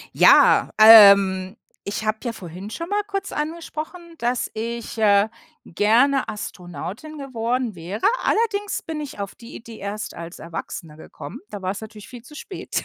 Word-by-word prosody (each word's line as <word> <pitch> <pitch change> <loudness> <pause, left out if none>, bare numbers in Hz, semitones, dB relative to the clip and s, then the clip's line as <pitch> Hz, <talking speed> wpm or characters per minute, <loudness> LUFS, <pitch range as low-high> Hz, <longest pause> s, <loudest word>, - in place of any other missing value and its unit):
Ja, - - +6
ähm, 200 -3 +8 0.3
ich 205 +2 -4
habe 215 0 0
ja 240 -2 -3
vorhin 185 0 -9
schon 335 +10 -6
mal 410 0 +1
kurz 395 -1 -4
angesprochen, 315 +2 -5 0.2
dass 240 -1 -2
ich, 230 +1 -5
äh, 205 -1 +4 0.4
gerne 240 +9 +2
Astronautin 205 - -7
geworden 245 -4 -3
wäre. 180 +6 -5 0.2
Allerdings 415 -2 0
bin 320 -2 -5
ich 290 -7 -8
auf 200 -1 -5
die 235 - -13
Idee 230 -1 -11
erst 205 +2 -6
als 170 +1 -9
Erwachsener 165 -1 -7
gekommen. 155 - -10
Da 205 -3 -8
war 185 0 -2
es 195 - -6
natürlich 215 -1 -11
viel 245 -2 -11
zu 300 - -14
spät. 370 - -5
220 Hz, 160 wpm, -22 LUFS, 200-275 Hz, 0.4 s, ähm